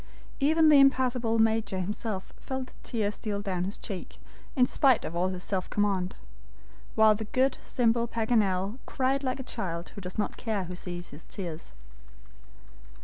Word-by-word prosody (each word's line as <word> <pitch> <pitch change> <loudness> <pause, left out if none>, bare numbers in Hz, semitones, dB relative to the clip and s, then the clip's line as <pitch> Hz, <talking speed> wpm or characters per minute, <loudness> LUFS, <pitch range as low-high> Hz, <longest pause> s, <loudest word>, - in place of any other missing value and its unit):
Even 315 +3 +5
the 295 -2 +8
impassable 250 -4 +3
Major 220 -3 +2
himself 200 +1 -4
felt 265 -2 -5
a - - -20
tear 215 -3 -1
steal 205 -1 -3
down 185 -3 -2
his 195 - -4
cheek 190 -3 -7 0.4
in 255 -3 +5
spite 260 -1 +3
of 165 - -5
all 180 +2 +2
his 185 -1 -4
self 190 -2 -2
command; 195 -3 0 0.8
while 220 -1 +7
the 220 +1 -4
good, 260 +5 +1
simple 235 -1 +1
Paganel 220 -2 +1
cried 270 +1 0
like 255 0 -1
a - - -4
child 170 -7 -4
who 200 - -9
does 180 0 -7
not 210 - -1
care 215 -4 -1
who 180 0 -6
sees 175 -1 -6
his 145 +3 -11
tears. 170 - -6
215 Hz, 165 wpm, -29 LUFS, 185-250 Hz, 0.8 s, the